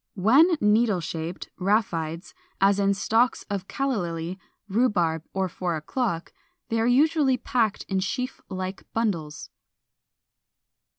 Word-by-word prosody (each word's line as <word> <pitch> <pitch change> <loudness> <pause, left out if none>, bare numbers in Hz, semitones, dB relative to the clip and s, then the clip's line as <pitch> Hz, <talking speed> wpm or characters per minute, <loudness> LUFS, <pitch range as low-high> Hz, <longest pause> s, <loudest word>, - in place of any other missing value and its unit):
When 275 - +5
needle 210 -2 +3
shaped 165 +1 -5
(rhaphides), 180 -4 -1 0.3
as 195 +1 +4
in 200 0 +2
stalks 225 +5 +2
of 195 -1 -3
Calla 275 -3 -1
Lily, 170 0 -4 0.3
Rhubarb, 190 -7 +1
or 190 -1 -1
Four 175 -1 -3
o'clock, 170 - -3 0.4
they 225 - 0
are 230 - +2
usually 275 +1 +3
packed 225 -5 0
in 190 -1 -1
sheaf 250 +8 -3
like 185 0 -6
bundles. 170 -10 -2
200 Hz, 120 wpm, -25 LUFS, 175-235 Hz, 0.4 s, When